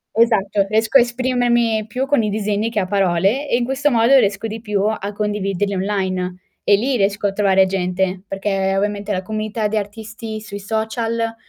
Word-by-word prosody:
Esatto 205 -4 +2
riesco 220 +5 +3
a 260 - +6
esprimermi 240 -3 +1
più 250 +5 -2
con 285 -6 +2
i 210 - 0
disegni 210 +1 -1
che 215 - 0
a 185 - -1
parole, 195 +7 +1
e - - +1
in 240 - 0
questo 270 +3 0
modo 235 +3 +5
riesco 205 -1 +1
di 220 +1 -6
più 210 -3 -1
a 210 -1 -3
condividerli 205 -1 -1
online 185 -2 -1 0.3
e 205 - +5
lì 250 +5 0
riesco 200 0 +1
a 195 - -2
trovare 195 -2 +4
gente, 185 0 -1
perché 195 -1 -1
ovviamente 205 +1 -1
la 185 -2 -1
comunità 215 +2 -2
di 220 - -1
artisti 220 +1 -6
sui 205 -1 -7
social 225 +2 -2
210 Hz, 185 wpm, -19 LUFS, 195-225 Hz, 0.3 s, a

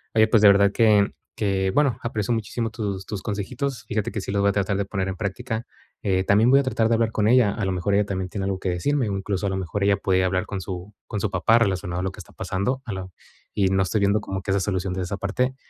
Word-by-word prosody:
Oye, 110 0 +5
pues 110 -1 +4
de 105 - +9
verdad 100 0 +5
que 105 -3 +4 0.2
que, 95 -2 0
bueno, 135 -1 +2
aprecio 110 -2 -1
muchísimo 115 +1 -2
tus 100 -4 -4
tus 105 -3 -5
consejitos. 115 +3 -3
Fíjate 105 -1 -2
que - - -3
sí 95 - -5
los 100 0 +1
voy 100 - +3
a - - -6
tratar 100 0 0
de 100 - -1
poner 95 -1 -2
en 95 - -3
práctica, 110 +4 -3 0.4
eh, 95 -1 +1
también 110 +5 +4
voy 135 - +7
a - - -3
tratar 115 -4 +1
de 115 - +4
hablar 115 -1 +1
con 105 -1 +1
ella. 120 -3 +5
A 110 - -4
lo 95 - 0
mejor 90 +3 -1
ella 105 0 +3
también 95 -2 -3
tiene 100 +1 -4
algo 95 -1 -2
que 95 - -2
decirme. 125 +9 0
Incluso 100 0 -2
a - - 0
lo 95 - -2
mejor 95 +2 -3
ella 100 0 +4
puede 95 -2 +1
hablar 95 0 0
con 100 - -4
su 95 +2 -7
con 105 - -3
su 105 - -1
papá 95 +5 +4
relacionado 95 -4 0
a - - -3
lo 95 - -1
que - - -14
está - - -12
pasando, 125 +8 -2
a 110 - -5
lo 95 -1 -6 0.4
y 100 -2 +2
no 95 0 +2
estoy 100 +3 0
viendo 100 +1 +3
como 95 -2 -4
que 95 - -2
esa 100 - +2
solución 95 -1 -1
de 95 - -3
esa 95 +3 -4
parte. 125 +7 -1
100 Hz, 275 wpm, -24 LUFS, 95-110 Hz, 0.4 s, de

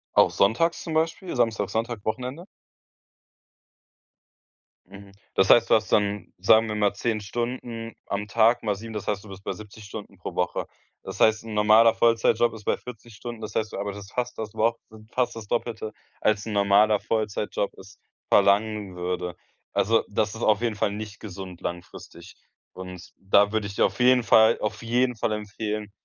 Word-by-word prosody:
Auch - - +6
sonntags 120 +13 +2
zum 165 - -5
Beispiel, 160 +2 -1
Samstag, 110 -4 0
Sonntag, 115 -1 -3
Wochenende? 130 +9 -4 2.4
Mhm. 100 0 -13 0.2
Das 95 - +3
heißt, 115 -1 +6
du - - +6
hast 110 -1 0
dann, 105 0 0
sagen 110 +4 +5
wir 105 - -3
mal, 105 -1 +2
10 110 +1 -2
Stunden 115 +1 -5
am 100 +1 -3
Tag 115 +3 +3
mal 105 -2 0
7, 110 +3 -9
das 105 - -5
heißt, 100 -1 -1
du 105 - -13
bist 95 0 -11
bei - - -3
70 105 0 -12
Stunden 100 -1 -9
pro 90 - -7
Woche. 90 - -1 0.4
Das - - -8
heißt, 110 0 +4
'n 110 - -6
normaler 110 +2 +6
Vollzeitjob 115 0 +3
ist 110 -1 -10
bei - - +1
40 120 -2 -11
Stunden, 120 +1 -8
das 110 -1 -7
heißt, 110 -1 -1
du - - -4
arbeitest 100 0 -6
fast 125 0 -3
das 110 -2 -5
Wo 115 +1 +2 0.4
fast 125 -2 0
das 110 -2 -8
Doppelte, 110 -2 -3 0.3
als 105 -1 +1
'n 110 - -4
normaler 100 +1 +4
Vollzeitjob 105 -2 -2
es 95 +1 -14 0.3
verlangen 100 -1 +2
würde. 90 0 -3 0.4
Also, 115 +3 +2
das 105 +1 -1
ist 110 - -8
auf 110 +1 +3
jeden 115 -3 0
Fall 105 - 0
nicht 105 0 -7
gesund 95 -3 -9
langfristig. 85 0 -8 0.4
Und 90 -1 -10
da 100 +1 +3
würde 110 -2 -1
ich 100 - -8
dir - - +4
auf - - -3
jeden 125 0 +5
Fall 110 +1 +5
auf 105 +2 -3
jeden 125 +2 +1
Fall 110 - -1
empfehlen, 105 0 -4
110 Hz, 180 wpm, -25 LUFS, 100-115 Hz, 2.4 s, Auch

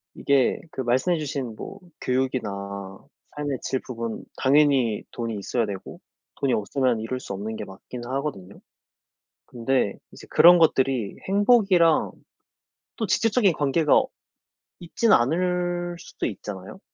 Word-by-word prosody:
이게 140 -3 +2
그 130 - -4
말씀해 130 +9 +1
주신 135 -6 -4
뭐 195 - -8 0.2
교육이나 100 -7 -2 0.4
삶의 145 -3 -3
질 130 - -1
부분 115 -2 -5
당연히 135 -5 +3
돈이 115 -2 -4
있어야 115 +3 -1
되고 100 -2 -7 0.4
돈이 135 -3 +1
없으면 120 +2 0
이룰 125 +3 -4
수 100 - -7
없는 105 +3 -5
게 - - -5
맞긴 120 +5 -10
하거든요. 130 -8 -5 0.9
근데 120 -3 0 0.2
이제 - - -13
그런 175 +1 +8
것들이 130 -8 +2
행복이랑 195 -5 +4 0.9
또 220 - -2
직접적인 210 -1 +3
관계가 150 +1 +3 0.8
있진 205 +6 +1
않을 175 +5 +1
수도 180 - -5
있잖아요. 105 - -7
130 Hz, 270 characters per minute, -24 LUFS, 115-170 Hz, 0.9 s, 그런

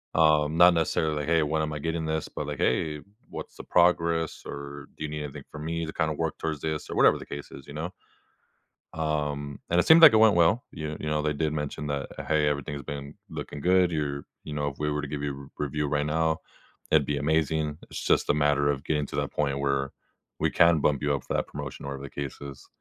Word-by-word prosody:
Um, 75 -1 +4
not 90 0 +8
necessarily, 80 -2 0
"Hey, 80 -1 +3
when 80 +1 0
am 75 -1 -2
I 75 - -4
getting 80 +1 -2
this?" 80 0 -1
But, 75 - -5
like, 75 -2 -4
"Hey, 75 -2 0 0.3
what's - - -8
the - - -8
progress? 85 -2 +2
Or 70 0 -7
do - - -5
you 75 - -3
need 75 0 -4
anything 70 - -7
from 75 0 -7
me 85 0 -2
to 80 - -6
kinda 80 -2 0
work 80 +1 -2
towards 80 -3 -3
this," 80 -1 -3
or - - -4
whatever - - +5
the - - -9
case 70 0 -8
is, 70 - -11
you 70 - -9
know? 85 +4 -4 1.0
Um, 75 -3 -2
and 85 - +3
it - - +3
seemed 165 +1 +8
like 155 - +11
it - - +7
went 110 -2 +6
well. 85 +8 +3
You 75 -1 -5
you 75 - -3
know, 75 0 +1
they 75 -1 0
did 75 +1 0
mention 75 0 -3
that, 70 -1 -2 0.2
"Hey, 75 -1 +2
everything's 70 0 -3
been 70 +2 -7
looking 75 - -6
good. 90 +1 +4
You're 70 -2 -2 0.2
you 75 - -6
know, 75 -1 -1
if 70 - -8
we 75 0 0
were 75 0 -1
to 75 - -5
give 75 -1 -4
you 70 -1 -1
a - - -10
r 70 - -13
review 75 0 -1
right 75 0 0
now, 80 +1 +1 0.5
it'd 75 -3 +4
be 75 -1 0
amazing. 80 0 0
It's - - -5
just - - +2
a - - +5
matter 75 -1 +3
of 70 -1 -3
getting 75 -2 0
to - - -7
that - - -2
point 70 -2 0
where 70 -1 0 0.5
we - - +2
can 85 -2 +5
bump 70 -2 +1
you 75 -1 +2
up 70 - -4
for - - -3
that - - 0
promotion," - - -7
or - - -5
whatever 70 0 -6
the 70 - -7
case 70 - -7
is. 70 -2 -9
75 Hz, 245 wpm, -27 LUFS, 70-80 Hz, 1.0 s, like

